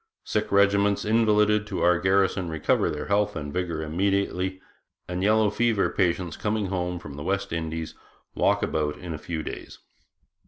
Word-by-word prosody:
Sick 105 -1 -2
regiments 100 0 +3
invalided 105 -1 +3
to 100 - -3
our 90 -1 +4
garrison 95 -1 +2
recover 80 -2 +1
their - - -4
health 105 0 +1
and 75 -2 -5
vigour 85 -3 -2
immediately, 95 +2 -1 0.5
and 90 +1 -3
yellow 105 +1 +3
fever 115 -3 +1
patients 90 -3 0
coming 105 -1 -1
home 90 -1 -2
from 75 -5 -9
the 75 - -6
West 95 0 -2
Indies 80 -1 -4 0.4
walk - - +2
about 75 -1 -1
in 90 -2 -6
a 75 - -6
few 80 -1 -4
days.' - - -8
95 Hz, 160 wpm, -26 LUFS, 85-105 Hz, 0.5 s, our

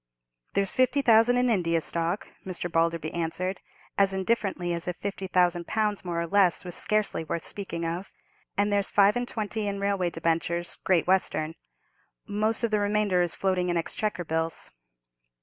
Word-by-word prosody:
"There's 195 -1 +2
fifty 255 +2 +2
thousand 230 0 +5
in 250 0 +3
India 170 -7 +2
stock," 170 +4 -1 0.2
Mr. 175 -2 -4
Balderby 165 -1 +1
answered, 180 +3 -2 0.4
as 195 -1 +4
indifferently 190 -3 0
as 170 0 -4
if 180 - -2
fifty 195 -1 -4
thousand 175 -2 +2
pounds 210 -2 0
more 175 -2 -2
or 170 - -1
less 185 0 +3
was 175 - -5
scarcely 215 -4 0
worth 160 +1 -4
speaking 170 -4 -4
of; 170 +4 -4 0.5
"and 205 +1 +2
there's 200 -1 +1
five 200 0 +5
and 245 0 -1
twenty 215 -1 -3
in 200 0 -2
railway 200 -3 0
debentures, 170 +1 -1
Great 180 -4 +3
Western. 165 -4 +1 0.7
Most 215 +3 0
of 230 - +1
the 210 - +2
remainder 205 -3 +2
is 175 -1 0
floating 185 -2 0
in 175 - +1
Exchequer 185 +3 -2
bills." 160 +1 -2
185 Hz, 165 wpm, -27 LUFS, 170-205 Hz, 0.7 s, thousand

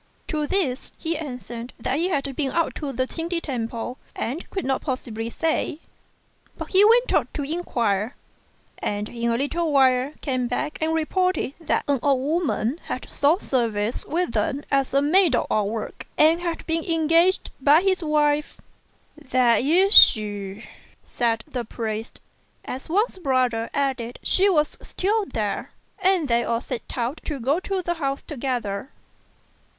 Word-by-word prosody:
To 305 -2 -1
this 290 -10 -1
he 330 +1 -2
answered 250 -5 -6
that 260 +4 -1
he 350 +2 +1
had 275 -5 -1
been 275 -1 0
out 335 +4 0
to 290 -2 -4
the 255 0 -1
Ch'ing 330 +5 -5
ti 345 -1 0
temple 245 -3 -4 0.2
and 265 +9 -4
couldn't 270 -9 -1
possibly 230 -4 -4
say; 315 +2 -1 0.8
but - - -6
he 385 +1 +5
went 470 +3 +5
off - - +3
to 290 - -3
inquire, 240 - -1 0.6
and 205 0 -2
in 235 0 -2
a 230 - +1
little 315 +5 -1
while 260 -1 +4
came 255 -3 -1
back 300 +5 -3
and 320 +1 +1
reported 365 -2 0
that 325 - 0
an 280 -2 +2
old 275 -1 +2
woman 305 -3 0
had - - -5
sought 305 +7 +2
service 230 -3 -1
with 345 -2 -1
them 250 +6 -1
as 275 -1 +2
a 275 +2 +3
maid 360 +4 +4
of - - +1
all 210 -2 +1
work, 220 0 -6
and 320 +3 +5
had 340 -2 -3
been 325 0 0
engaged 330 +3 +2
by 295 +4 +6
his 375 -2 +1
wife. 300 -1 +1 0.6
"That 255 -5 +2
is 365 - +3
she," 205 -1 +5 0.4
said 230 -2 -1
the 250 -2 -4
priest, 220 0 -5 0.5
as 260 +4 -6
Wang's 395 +3 +1
brother 255 -7 +1
added 265 -4 -2
she 390 +2 +3
was 305 -5 +1
still 415 +2 -1
there; 215 -5 -3 0.3
and 370 -5 +2
they 235 -1 +2
all 230 - 0
set 250 -2 -6
out 250 +6 -2
to 290 -3 -3
go 275 +7 +1
to 375 0 -3
the 345 - 0
house 275 -4 -3
together. 245 -6 -3
275 Hz, 160 wpm, -24 LUFS, 240-330 Hz, 0.8 s, by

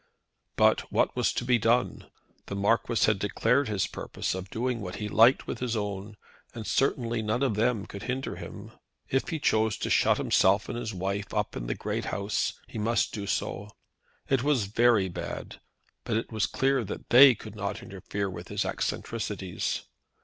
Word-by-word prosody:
But - - +3
what - - +2
was - - +2
to 120 - -2
be 125 -1 +3
done? 120 +3 +1 0.4
The 100 - -4
Marquis 115 +3 +2
had 105 -2 +2
declared 120 +7 +1
his 105 -4 0
purpose - - -4
of 95 0 -6
doing 120 +1 -2
what 90 -2 -5
he 105 - -4
liked 115 +5 +5
with - - -5
his 125 -2 -1
own, 105 0 -4 0.4
and 115 -2 -6
certainly 120 -3 +1
none 110 +5 0
of 130 -5 +2
them 110 0 +1
could 100 - -9
hinder 130 +1 -3
him. - - -9 0.4
If 135 - +1
he 165 - -1
chose 110 -6 +2
to - - -3
shut - - +4
himself 100 +3 +3
and - - -3
his 120 -2 -3
wife 100 +1 -3
up - - -1
at - - -4
the - - -1
big - - -3
house, 100 +1 -1
he - - -6
must 115 +3 +1
do 100 -2 -4
so. 105 +1 -2 0.6
It 135 -2 +2
was 135 -6 +2
very 110 -1 +3
bad, 85 - -6 0.4
but 110 - -1
it 115 - -4
was 110 -6 0
clear 135 -2 +1
that 105 - -7
they 130 +1 +9
could 110 -1 -10
not 100 -1 -4
interfere 100 +1 -4
with 95 - -7
his - - -2
eccentricities. 105 -5 -3
110 Hz, 185 wpm, -28 LUFS, 100-120 Hz, 0.6 s, they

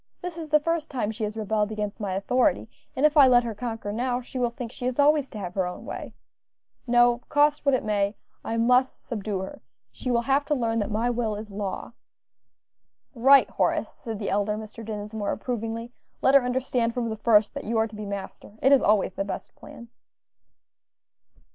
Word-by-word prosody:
"This 360 -2 -4
is 325 -2 -7
the 300 0 +5
first 330 0 -1
time 240 -6 -2
she 220 0 -3
has 210 +1 -5
rebelled 215 0 0
against 210 -1 -4
my 195 -3 -2
authority, 245 +6 +1 0.3
and 275 - +2
if 305 0 +4
I 285 -3 +8
let 245 -1 +5
her 230 -1 -3
conquer 225 -2 -5
now, 245 +2 -1
she 255 +1 -7
will 245 -1 +2
think 235 -1 -7
she 250 0 -4
is 255 - -2
always 290 -1 +4
to - - -9
have 180 -3 -5
her 185 -2 0
own 180 - -7
way. - - -7 0.7
No; 240 0 +4
cost 295 0 +2
what 275 - +5
it - - -2
may, 205 -1 0 0.3
I 225 - -2
must 250 +3 +2
subdue 210 -4 -3
her; 190 - -8 0.3
she 125 - -6
will 235 -1 +2
have 275 +3 +2
to 295 - +1
learn 230 -3 0
that 205 - -1
my 225 +3 0
will 230 -3 -1
is 210 0 -8
law." 200 +2 -5 1.2
"Right, 270 +3 +6
Horace," - - 0
said 225 -4 -4
the 200 -1 -3
elder 205 +1 0
Mr. 220 +1 -9
Dinsmore, 210 -1 -4
approvingly, 230 -1 -4 0.3
"let 265 - +5
her 275 - +8
understand 245 -2 0
from 240 -2 -1
the 220 - -3
first 210 -1 +4
that - - -6
you 230 +1 -1
are 220 0 +2
to 215 - -12
be 210 -1 -6
master; 200 +1 -7
it 270 - +3
is 275 - +6
always 205 -3 +2
the 195 - -2
best 195 - -6
plan." 235 - -12
230 Hz, 205 wpm, -26 LUFS, 210-255 Hz, 1.2 s, I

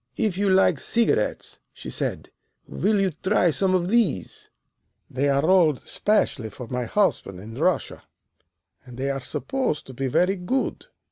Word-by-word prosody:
"'If 210 -5 0
you 200 +1 +1
like 190 0 +4
cigarettes,' 235 -1 0
she - - -9
said, - - -3 0.4
'will 210 0 0
you 195 -1 +1
try 180 +2 +1
some 185 +4 +1
of 175 -1 0
these? 195 - 0 0.6
They 140 +3 0
are 140 +2 +2
rolled 170 -6 +4
especially 145 - 0
for 120 +4 -9
my 125 +1 -3
husband 115 - 0
in 110 +4 -10
Russia, 165 +8 -1 0.8
and 125 -1 -12
they 135 +1 -1
are 135 0 -4
supposed 250 - -2
to 130 - -11
be 135 +2 -2
very 180 +9 +2
good. 255 - -2
175 Hz, 155 wpm, -24 LUFS, 130-195 Hz, 0.8 s, like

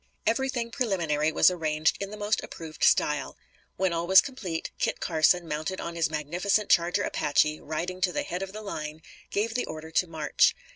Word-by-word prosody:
Everything 240 0 0
preliminary 170 - 0
was 185 - +5
arranged 155 -2 0
in 200 - -3
the 210 - -8
most 210 +1 0
approved 160 -2 -8
style. - - +2 0.4
When 185 -1 0
all 170 +1 -2
was 190 +1 +9
complete, 190 - -3
Kit - - 0
Carson, 165 +1 +2
mounted 155 +5 -3
on 170 - -5
his 165 -2 +1
magnificent 175 +7 0
charger 170 +1 +3
Apache, 150 +1 +1
riding 175 +4 -4
to 185 -1 +2
the 290 - -2
head 180 -9 -4
of 195 0 -5
the 215 +2 -8
line, 155 -5 -6 0.3
gave 220 +3 -1
the 245 - -1
order 155 0 -7
to 180 - +2
march. 160 -2 +2
175 Hz, 185 wpm, -27 LUFS, 155-200 Hz, 0.4 s, was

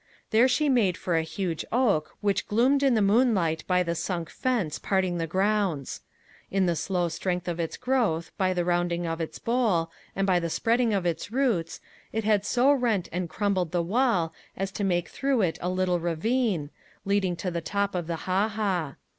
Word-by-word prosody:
There 230 +3 +5
she 295 +4 +1
made 225 -10 +2
for 175 - -1
a 165 - +3
huge 165 0 -3
oak, 215 -11 +1
which 200 -2 0
gloomed 255 +6 +3
in 270 -3 +3
the 215 - +3
moonlight 200 -7 +2
by 180 -1 +3
the 170 -1 -1
sunk 170 -1 -3
fence 230 - -1
parting 185 -3 0
the 165 - -1
grounds. 190 -5 0 0.5
In 195 -1 +1
the 175 -1 +1
slow 175 +2 0
strength 180 +1 -3
of 175 -1 -3
its 165 -1 -3
growth, 230 -11 0
by 190 -2 +1
the 175 -1 0
rounding 175 0 0
of 165 0 -3
its 160 - -5
bole, 215 -9 +1 0.2
and 195 0 0
the 175 -3 +2
spreading 230 +6 +1
of 195 -3 0
its 175 +4 -2
roots, 230 -10 0 0.3
it 220 +1 -2
had 210 -2 +2
so 255 +3 +4
rent 230 -9 0
and 180 0 -3
crumbled 190 -4 0
the 175 -1 +1
wall 195 -4 +1 0.2
as 195 0 -2
to 205 - -4
make 175 -3 +1
through 270 -5 0
it 165 -3 -1
a 180 - -1
little 185 -1 +1
ravine, 175 - 0 0.3
leading 195 -3 +1
to 180 +1 -3
the 170 0 -3
top 200 +4 -1
of 175 -3 -3
the 165 -1 -4
ha 190 +3 +2
ha. 190 -9 -2
185 Hz, 195 wpm, -27 LUFS, 170-220 Hz, 0.5 s, There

